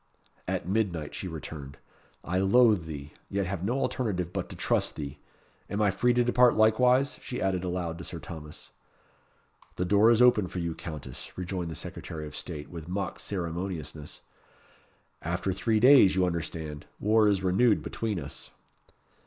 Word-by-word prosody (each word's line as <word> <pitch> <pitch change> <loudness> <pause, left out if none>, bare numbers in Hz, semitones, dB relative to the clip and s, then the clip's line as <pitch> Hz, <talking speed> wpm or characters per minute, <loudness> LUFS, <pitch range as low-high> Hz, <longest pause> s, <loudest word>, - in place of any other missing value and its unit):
"At - - -2
midnight," 90 -7 -1
she 95 - -5
returned. 75 -4 -7 0.5
"I 90 +2 -1
loathe 105 -2 +4
thee, 75 -2 -7 0.2
yet 100 0 -1
have 90 -1 -4
no 120 +7 0
alternative 90 -11 -1
but - - -3
to - - -8
trust - - 0
thee. 70 -1 -6 0.5
Am 100 - -2
I 105 -2 +3
free 120 +6 +2
to 120 - +4
depart 125 0 +5
likewise?" 125 +5 +4
she 125 - -5
added 95 -2 0
aloud 90 -2 -3
to - - -6
Sir 85 - -6
Thomas. 80 -1 -9 1.0
"The 90 - -1
door 105 +4 +5
is 115 -1 +5
open 125 -6 +5
for 90 - -7
you, 85 -2 -2
Countess," 75 -6 -8
rejoined 90 -1 -3
the 80 - -6
Secretary 80 +1 -6
of 75 - -9
State, 75 -1 -6
with 85 -2 -8
mock 95 -1 -3
ceremoniousness. 85 -5 -4 1.0
"After 85 +3 -1
three 110 +3 +1
days, 125 -5 +7
you 95 -1 +3
understand, 80 -3 -4
war 110 +1 +4
is 100 -2 +2
renewed 100 +5 +3
between 110 -5 -2
us." 70 -2 -8
90 Hz, 160 wpm, -28 LUFS, 80-110 Hz, 1.0 s, days